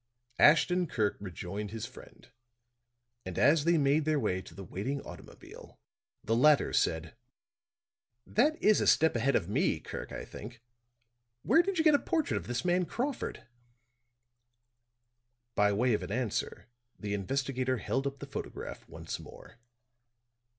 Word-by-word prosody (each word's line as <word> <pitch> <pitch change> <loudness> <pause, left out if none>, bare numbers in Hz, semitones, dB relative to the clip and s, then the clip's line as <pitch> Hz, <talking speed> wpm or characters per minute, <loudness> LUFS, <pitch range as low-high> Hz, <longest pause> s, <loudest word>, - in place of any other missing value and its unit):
Ashton 175 +3 +5
Kirk 105 -7 0
rejoined 100 +2 -6
his 110 +1 -5
friend; - - -14 1.0
and 95 -2 -7
as 150 0 +4
they 170 0 +4
made 145 +1 +3
their 155 -1 +1
way 95 -7 -1
to - - -14
the 100 - -8
waiting 105 +10 -4
automobile, - - -12 0.5
the 115 - +1
latter 150 +4 +4
said; 80 -1 0 1.1
"That 300 +8 +2
is 215 -1 +5
a - - +1
step 160 -3 +4
ahead 125 +3 +1
of 85 - +1
me, 100 - +1
Kirk, - - -7
I - - -6
think. 115 +3 -10 0.8
Where 330 - +5
did 385 0 -2
you 320 - +3
get 310 -2 +6
a 285 - +5
portrait 320 -4 0
of - - -6
this 120 +7 -3
man 180 0 +2
Crawford?" 250 - -4 2.1
By 105 -2 +3
way 120 +4 +2
of 105 - 0
an - - -6
answer 125 -4 -2 0.3
the 105 -1 -4
investigator 130 +5 -1
held 135 +6 -1
up 140 0 -5
the - - -8
photograph - - -7
once - - -6
more. 115 - -14
130 Hz, 150 wpm, -31 LUFS, 105-165 Hz, 2.1 s, get